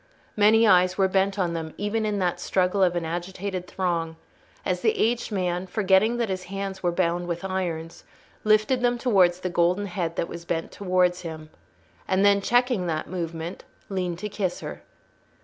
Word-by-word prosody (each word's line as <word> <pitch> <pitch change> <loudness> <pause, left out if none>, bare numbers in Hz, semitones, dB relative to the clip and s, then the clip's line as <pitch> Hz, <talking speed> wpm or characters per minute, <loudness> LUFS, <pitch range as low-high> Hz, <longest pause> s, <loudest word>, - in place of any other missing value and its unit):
Many 220 +2 +5
eyes 185 -2 +4
were 195 -1 +4
bent 195 +1 +1
on 175 -3 0
them 160 -1 -5
even 215 +2 -1
in 210 -1 -1
that 180 -2 0
struggle 185 +2 +1
of 180 -2 +3
an 170 -1 -1
agitated 180 +2 -4
throng, 170 -4 -2 0.5
as - - -1
the 440 -1 +2
aged 235 - 0
man, 180 -2 -1
forgetting 200 +4 +3
that 235 -1 0
his 185 -1 -3
hands 195 0 -5
were 175 - +1
bound 175 0 0
with 170 +1 -3
irons, 170 -3 -3 0.4
lifted 215 +4 +3
them 245 0 +2
towards 185 -8 +3
the 185 - -2
golden 175 +4 +2
head 175 -4 -3
that 170 - -1
was 170 - -8
bent 165 -1 -3
towards 180 -2 +1
him, 155 -2 -8 0.6
and 190 +1 +2
then, 200 0 +5
checking 245 -4 +2
that 155 -2 -2
movement, 170 -1 -5 0.3
leaned 180 -3 -2
to 210 +4 -4
kiss 195 -3 -2
her. - - -7
185 Hz, 180 wpm, -25 LUFS, 175-200 Hz, 0.6 s, Many